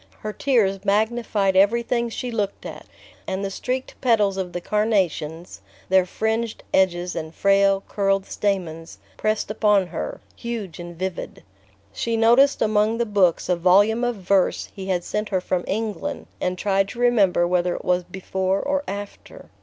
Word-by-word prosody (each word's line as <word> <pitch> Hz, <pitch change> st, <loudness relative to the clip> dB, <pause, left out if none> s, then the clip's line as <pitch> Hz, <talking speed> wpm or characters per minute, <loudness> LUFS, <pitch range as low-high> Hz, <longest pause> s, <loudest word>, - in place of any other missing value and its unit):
Her 215 Hz, 0 st, -4 dB
tears 205 Hz, -9 st, +1 dB
magnified 210 Hz, -1 st, +1 dB
everything 235 Hz, +4 st, +2 dB
she 245 Hz, +2 st, -5 dB
looked 205 Hz, -3 st, -3 dB
at, -, -, -8 dB, 0.4 s
and 190 Hz, +1 st, -2 dB
the 195 Hz, -, -3 dB
streaked 255 Hz, +6 st, -3 dB
petals 210 Hz, -6 st, +3 dB
of 190 Hz, -2 st, -3 dB
the 175 Hz, -, -4 dB
carnations, 175 Hz, -, -1 dB, 0.3 s
their 190 Hz, -1 st, +4 dB
fringed 220 Hz, +3 st, -2 dB
edges 180 Hz, -1 st, +1 dB
and 160 Hz, 0 st, -5 dB
frail 195 Hz, 0 st, +3 dB
curled 195 Hz, -1 st, 0 dB
stamens, 170 Hz, -5 st, -3 dB, 0.2 s
pressed 215 Hz, -1 st, -1 dB
upon 210 Hz, -3 st, +3 dB
her, 170 Hz, -2 st, -5 dB, 0.2 s
huge 220 Hz, -8 st, -6 dB
and 175 Hz, -1 st, -8 dB
vivid. 185 Hz, 0 st, -5 dB, 0.5 s
She 230 Hz, -1 st, -1 dB
noticed 240 Hz, +5 st, +4 dB
among 215 Hz, +1 st, +2 dB
the 235 Hz, -, 0 dB
books 195 Hz, -6 st, +2 dB
a 180 Hz, -, +2 dB
volume 200 Hz, +7 st, +4 dB
of 245 Hz, -1 st, 0 dB
verse 195 Hz, -1 st, +1 dB
he 195 Hz, -2 st, -7 dB
had 180 Hz, -2 st, 0 dB
sent 210 Hz, +3 st, -3 dB
her 190 Hz, -, +1 dB
from 180 Hz, -1 st, -2 dB
England, 215 Hz, 0 st, -3 dB, 0.2 s
and 180 Hz, 0 st, -1 dB
tried 195 Hz, 0 st, +1 dB
to 235 Hz, -, -9 dB
remember 205 Hz, -8 st, +3 dB
whether 180 Hz, 0 st, +1 dB
it -, -, -8 dB
was 180 Hz, 0 st, +2 dB
before 190 Hz, +1 st, -2 dB
or 285 Hz, +4 st, 0 dB
after... 200 Hz, +1 st, -8 dB
195 Hz, 160 wpm, -23 LUFS, 185-220 Hz, 0.5 s, their